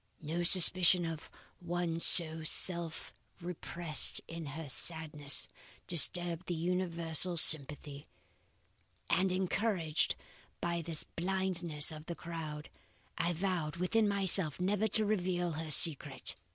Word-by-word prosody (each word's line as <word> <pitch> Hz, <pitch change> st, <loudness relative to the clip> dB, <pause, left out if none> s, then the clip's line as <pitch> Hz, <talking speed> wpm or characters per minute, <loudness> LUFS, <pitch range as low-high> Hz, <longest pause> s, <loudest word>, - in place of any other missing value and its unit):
No 160 Hz, +3 st, -5 dB
suspicion 180 Hz, 0 st, +5 dB
of 165 Hz, -2 st, -9 dB, 0.3 s
one 175 Hz, -1 st, -5 dB
so 160 Hz, -1 st, +7 dB
self 170 Hz, 0 st, -2 dB, 0.3 s
repressed 170 Hz, -2 st, -2 dB
in 165 Hz, -2 st, -10 dB
her 150 Hz, +3 st, -9 dB
sadness 150 Hz, +2 st, +4 dB, 0.4 s
disturbed 175 Hz, 0 st, +1 dB
the 175 Hz, -, -5 dB
universal 170 Hz, 0 st, -2 dB
sympathy; 145 Hz, -2 st, +3 dB, 1.0 s
and 185 Hz, 0 st, 0 dB
encouraged 185 Hz, -3 st, -3 dB, 0.4 s
by 170 Hz, 0 st, -5 dB
this 165 Hz, -1 st, -6 dB
blindness 175 Hz, -4 st, -4 dB
of 155 Hz, 0 st, -13 dB
the 170 Hz, -, -7 dB
crowd, 155 Hz, -3 st, -10 dB, 0.5 s
I 175 Hz, 0 st, -2 dB
vowed 170 Hz, -3 st, -5 dB
within 185 Hz, +5 st, -2 dB
myself 190 Hz, -6 st, -3 dB
never 200 Hz, +4 st, -2 dB
to 220 Hz, -1 st, -1 dB
reveal 180 Hz, -4 st, -3 dB
her 160 Hz, 0 st, -8 dB
secret. 145 Hz, -3 st, +1 dB
170 Hz, 110 wpm, -30 LUFS, 155-180 Hz, 1.0 s, so